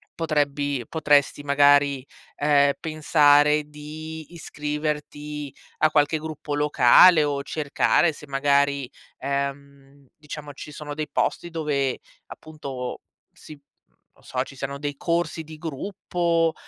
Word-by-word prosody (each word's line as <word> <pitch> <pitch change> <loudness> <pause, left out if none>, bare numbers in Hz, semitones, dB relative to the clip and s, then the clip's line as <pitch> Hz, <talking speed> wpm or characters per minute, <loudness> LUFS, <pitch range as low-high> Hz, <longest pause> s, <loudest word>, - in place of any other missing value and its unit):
potrebbi 145 -5 -1
potresti 145 -3 +2
magari, 140 -1 +4 0.3
ehm, 145 -1 +3
pensare 150 -1 +4
di 155 +2 -9
iscriverti 150 -2 -5 0.2
a 155 - +3
qualche 145 +2 +2
gruppo 155 -1 -5
locale 150 +3 +6
o 140 -1 -1
cercare 155 +3 +1
se 150 0 -13
magari, 140 -1 +1 0.3
ehm, 140 0 -5
diciamo 150 -1 -9
ci 150 +1 -10
sono 150 0 -7
dei 155 0 -4
posti 175 - -1
dove 145 -5 -1 0.3
appunto 140 -5 -7 0.3
si 155 - -13 0.6
non - - -25
so, 125 0 -2
ci 135 - -13
siano 140 +1 -5
dei 145 0 -4
corsi 170 +1 -1
di 155 0 -11
gruppo, 165 +1 -1
145 Hz, 115 wpm, -24 LUFS, 140-155 Hz, 0.6 s, locale